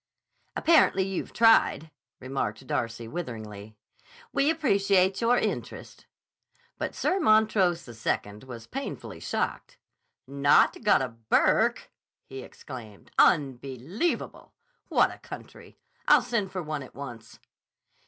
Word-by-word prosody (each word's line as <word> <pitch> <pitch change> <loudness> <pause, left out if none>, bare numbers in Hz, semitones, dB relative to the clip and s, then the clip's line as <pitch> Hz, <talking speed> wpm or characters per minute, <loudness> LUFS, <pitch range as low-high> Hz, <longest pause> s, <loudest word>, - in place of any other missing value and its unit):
"Apparently 310 - +4
you've 190 -1 -4
tried," 225 -8 +4 0.3
remarked 130 -2 -4
Darcy 115 -2 -3
witheringly. 110 -8 -7 0.6
"We 280 +2 +2
appreciate 200 - +2
your 240 +1 +3
interest." - - -4 0.7
But - - -3
Sir 380 - 0
Montrose 215 - +3
II 110 -3 -3
was 115 -3 -9
painfully 275 +1 -6
shocked. - - -3 0.5
"Not 140 +1 +3
got 205 -10 +4
a 130 - -3
Burke!" 115 -1 +1 0.3
he 135 0 -8
exclaimed. 115 -6 -11
"Unbelievable! 140 - 0 0.3
What - - +3
a - - -14
country! - - -12 0.3
I'll - - +6
send 210 -5 -2
for 185 -2 -4
one, 155 -2 -4
at 130 - -12
once." 120 -5 -9
145 Hz, 110 wpm, -27 LUFS, 120-200 Hz, 0.7 s, I'll